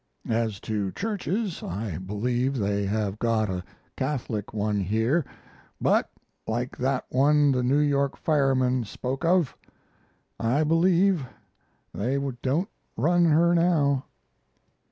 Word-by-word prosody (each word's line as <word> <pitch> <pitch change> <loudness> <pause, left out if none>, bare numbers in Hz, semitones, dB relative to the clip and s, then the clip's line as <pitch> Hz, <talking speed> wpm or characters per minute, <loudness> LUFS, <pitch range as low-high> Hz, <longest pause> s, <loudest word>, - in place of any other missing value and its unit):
As 110 -3 -1
to 105 -3 -2
churches, 205 -2 -2
I 95 -2 -4
believe 120 +7 -1
they 100 -2 0
have 105 0 -1
got 110 -3 +1
a 90 -1 -3 0.3
Catholic 125 -7 -3
one 105 -1 -1
here, 110 - +1 0.6
but, - - +2 0.4
like 120 +3 -2
that 130 +1 0
one 145 +2 +4
the 130 -1 +1
New 130 +3 +2
York 140 -2 +1
fireman 130 -4 +2
spoke 130 +5 -5
of, 170 -6 +2 0.8
I 125 +7 +2
believe 170 0 +3 0.7
"they 125 +7 -1 0.2
don't 160 - 0 0.3
run 170 +8 +3
her 170 +2 +4
now." 155 -6 +2
130 Hz, 115 wpm, -26 LUFS, 110-155 Hz, 0.8 s, one